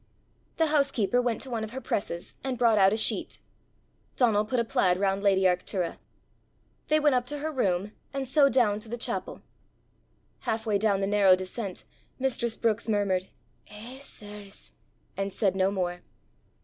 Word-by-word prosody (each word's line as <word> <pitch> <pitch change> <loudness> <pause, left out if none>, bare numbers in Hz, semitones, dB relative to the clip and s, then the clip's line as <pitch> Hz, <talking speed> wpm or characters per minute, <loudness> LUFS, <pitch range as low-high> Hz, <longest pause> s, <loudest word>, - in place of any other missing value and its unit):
The 325 - +3
housekeeper 250 -5 +2
went 240 -2 -1
to 265 - -9
one 225 -2 -2
of 220 +1 -6
her 265 - -4
presses, 185 -8 -3
and 265 -2 -2
brought 230 -3 +4
out 190 0 +6
a 215 - +1
sheet. 220 - 0 0.8
Donal 215 -4 +3
put 245 +3 0
a - - +2
plaid 180 -4 +2
round 195 0 +1
lady 195 -2 +3
Arctura. 180 -1 0 0.9
They 310 0 +3
went 295 -2 +3
up 250 -1 +1
to 295 - -3
her 310 +2 -3
room, 200 -7 0 0.2
and 275 -1 -3
so 275 +2 +5
down 225 -5 +2
to 215 - -9
the 240 - -4
chapel. 235 - -4 1.0
Half 220 +1 -2
way 210 -2 +1
down 200 -2 +2
the - - +1
narrow 200 -2 +5
descent 185 +1 -5 0.3
mistress 240 -3 -1
Brookes 230 0 0
murmured, 195 -3 +1 0.4
"Eh, 230 +5 -10
sirs!" 210 -6 -7 0.4
and 195 0 -2
said 195 -2 +1
no 190 0 +2
more. 180 -3 -2
215 Hz, 170 wpm, -28 LUFS, 195-245 Hz, 1.0 s, out